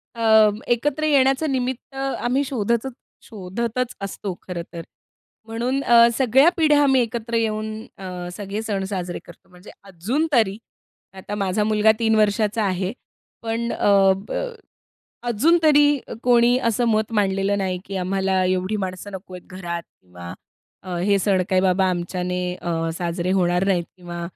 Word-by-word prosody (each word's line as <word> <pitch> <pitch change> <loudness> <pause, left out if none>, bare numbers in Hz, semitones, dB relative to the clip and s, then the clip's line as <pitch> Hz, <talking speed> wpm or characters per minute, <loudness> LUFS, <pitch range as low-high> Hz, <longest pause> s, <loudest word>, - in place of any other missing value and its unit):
अ, 220 -2 +5 0.2
एकत्र 285 +6 0
येण्याचं 275 +1 +3
निमित्त 260 +1 -3
आम्ही 270 0 -1
शोधतत 235 0 -1 0.3
शोधतच 230 +4 -4
असतो 195 0 -5
खरं 180 -2 -5
तर. 170 - -5 0.7
म्हणून 245 +5 -1
अ, 235 -2 +6
सगळ्या 265 +5 +5
पिढ्या 300 -3 +4
आम्ही 270 -2 +4
एकत्र 235 0 -3
येऊन 220 -1 -1 0.3
अ, 180 -2 -6
सगळे 205 +1 -4
सण 200 -3 -2
साजरे 180 -3 -4
करतो. - - -16
म्हणजे 180 +2 -14
अजून 200 - -2
तरी. 215 -5 +3 0.6
आता 195 +2 -7
माझा 195 +1 0
मुलगा 215 0 +4
3 220 -1 +2
वर्षाचा 215 +1 +1
आहे 185 0 -1 0.5
पण 230 +1 -2
अ, 195 -1 +4 1.2
अजून 295 +10 +3
तरी 295 -2 +6 0.4
कोणी 245 0 +4
असं 230 +1 +1
मत 215 0 0
मांडलेलं 195 -1 +1
नाही, 185 -2 -2
की 195 -1 -6
आम्हाला 190 0 0
एवढी 185 +3 0
माणसं 190 0 -5
नको 185 -1 -9
आहेत 180 - -11
घरात 170 -2 -4 0.2
किंवा 90 -1 -10 0.7
हे 200 -1 +3
सण 190 -2 +2
काही 185 -1 +3
बाबा 190 0 +2
आमच्याने 180 +1 -3
अ, 165 -2 -3
साजरे 175 +1 -2
होणार 180 -1 +2
नाहीत 180 -3 +1
किंवा 175 -1 -7
205 Hz, 145 wpm, -22 LUFS, 185-235 Hz, 1.2 s, अ